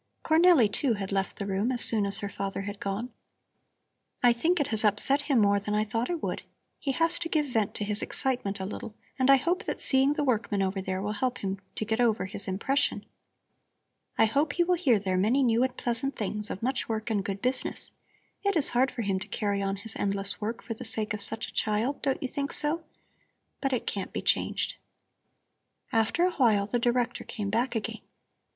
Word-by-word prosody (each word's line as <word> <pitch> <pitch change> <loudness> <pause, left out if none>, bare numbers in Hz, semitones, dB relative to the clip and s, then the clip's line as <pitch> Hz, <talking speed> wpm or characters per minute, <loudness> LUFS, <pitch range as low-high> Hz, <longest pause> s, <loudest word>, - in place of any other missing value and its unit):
Cornelli, 320 -6 +5
too, 230 +4 0
had 195 -1 -5
left 195 -1 -1
the 200 - -4
room 200 +5 0
as 245 - -1
soon 210 -3 +2
as 200 - -1
her 200 - -4
father 195 0 -4
had 205 0 -6
gone. 205 +5 -4 1.1
"I 245 -1 +6
think 330 +9 +1
it 285 - 0
has 220 -1 0
upset 215 +7 +3
him 280 -2 +1
more 200 -2 +4
than 210 +1 -3
I 210 - +2
thought 225 +3 -2
it 345 -3 -3
would. - - -2 0.4
He 275 - -1
has 330 +4 +2
to 335 -1 -3
give 305 -2 +1
vent 225 -7 -1
to - - -3
his 205 0 0
excitement 245 -7 -2
a 190 - -3
little, 210 +2 -7 0.2
and 260 +1 +2
I 275 - +9
hope 345 +7 -1
that - - -3
seeing 270 +1 +3
the 295 0 -1
workmen 215 -6 0
over 190 0 -2
there 190 0 -3
will 205 - -2
help 250 +4 -1
him 195 -2 -4 0.2
to 215 - -2
get 220 +2 0
over 225 -5 +2
his 200 +1 +1
impression. 205 +9 0 1.1
I 225 - +6
hope 285 +6 +1
he 345 - +2
will 360 +1 +1
hear 290 -10 +3
there 190 -2 -1
many 230 +9 +2
new 235 -1 +3
and 260 0 0
pleasant 245 +3 -2
things 210 0 -3
of 195 - -6
much 260 0 -1
work 220 0 -2
and 205 -3 0
good 195 0 -4
business. 255 +4 -1 0.5
It 400 -1 +1
is 305 -4 +6
hard 255 +2 +2
for 245 -2 -5
him 195 -2 0
to 195 - -7
carry 205 -2 -1
on 195 0 -1
his 200 +2 -6
endless 200 0 +2
work 225 +2 -4
for 230 - -4
the 220 - -9
sake 215 -1 -1
of 210 - -4
such 225 +2 0
a - - -12
child, 220 +6 -1
don't 270 -1 -1
you - - 0
think 280 +2 -3
so? 310 +3 +6 0.8
But 270 - 0
it 250 - -1
can't 195 - -4
be - - -4
changed." - - 0 1.2
After 225 +9 +2
a 365 - +1
while 220 - +3
the 240 +4 -1
Director 240 0 0
came 205 -4 -5
back 235 +3 0
again. 225 +1 -4
225 Hz, 220 wpm, -28 LUFS, 200-265 Hz, 1.2 s, I